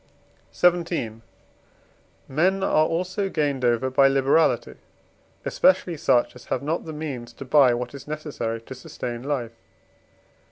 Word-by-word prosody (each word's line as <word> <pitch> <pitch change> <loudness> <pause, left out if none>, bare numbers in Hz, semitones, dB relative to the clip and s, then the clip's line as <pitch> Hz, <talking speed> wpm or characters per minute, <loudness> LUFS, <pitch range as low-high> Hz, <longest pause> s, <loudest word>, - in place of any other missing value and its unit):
XVII. 170 -11 +1 1.1
Men 185 +7 +1
are 155 -4 +3
also 185 +4 -2
gained 145 -6 -1
over 120 +2 +1
by 135 +1 +5
liberality, 135 +4 +2 0.7
especially 230 -11 +2
such 125 -6 +2
as 125 - -13
have 130 - -2
not 160 +4 -2
the 160 - -6
means 145 -6 -6
to 135 - -9
buy 130 -2 +5
what 120 +1 -5
is 140 - -10
necessary 145 -7 -4
to 125 - -9
sustain 120 -2 -6
life. 130 -4 -3
140 Hz, 130 wpm, -24 LUFS, 125-160 Hz, 1.1 s, by